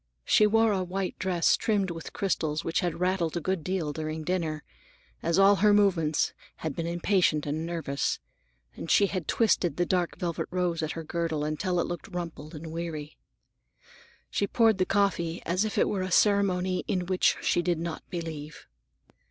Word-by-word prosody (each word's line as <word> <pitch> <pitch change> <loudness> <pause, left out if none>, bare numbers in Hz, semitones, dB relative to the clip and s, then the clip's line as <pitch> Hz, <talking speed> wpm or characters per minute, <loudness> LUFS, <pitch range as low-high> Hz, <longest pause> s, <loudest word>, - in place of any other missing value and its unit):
She 215 - +5
wore 225 +1 +4
a 190 -2 0
white 185 +1 -3
dress 180 -3 +2
trimmed 200 -4 0
with 165 -1 -7
crystals 160 -5 -1
which 165 +6 0
had 175 -4 -2
rattled 180 -2 0
a - - 0
good 185 0 -2
deal 170 -4 -2
during 155 +1 -4
dinner, 160 -3 -2 0.6
as 170 +1 +1
all 195 +1 +6
her 205 +1 +5
movements 175 -7 +2 0.2
had 155 -3 -4
been 165 -1 -3
impatient 170 -3 +1
and 155 +3 -2
nervous, 165 -5 -1 0.6
and 165 - -7
she 200 - +5
had 185 -2 -3
twisted 200 -6 +2
the 175 - +2
dark 180 -1 0
velvet 170 -3 -2
rose 180 -2 -1
at 155 0 -2
her 165 - -6
girdle 160 -2 -2
until 175 +4 -1
it - - +1
looked 170 -5 -5
rumpled 170 -3 -6
and 160 +1 -7
weary. 160 -3 -5 1.2
She 200 - 0
poured 225 -2 +3
the 185 - +2
coffee 180 -4 +1
as 185 +5 +1
if 215 - -3
it - - +4
were 195 - -1
a 185 - -2
ceremony 185 -2 +2
in 180 -2 -1
which 185 0 +2
she - - +1
did 175 -1 0
not 165 0 -4
believe. 160 -3 -6
175 Hz, 180 wpm, -28 LUFS, 160-190 Hz, 1.2 s, all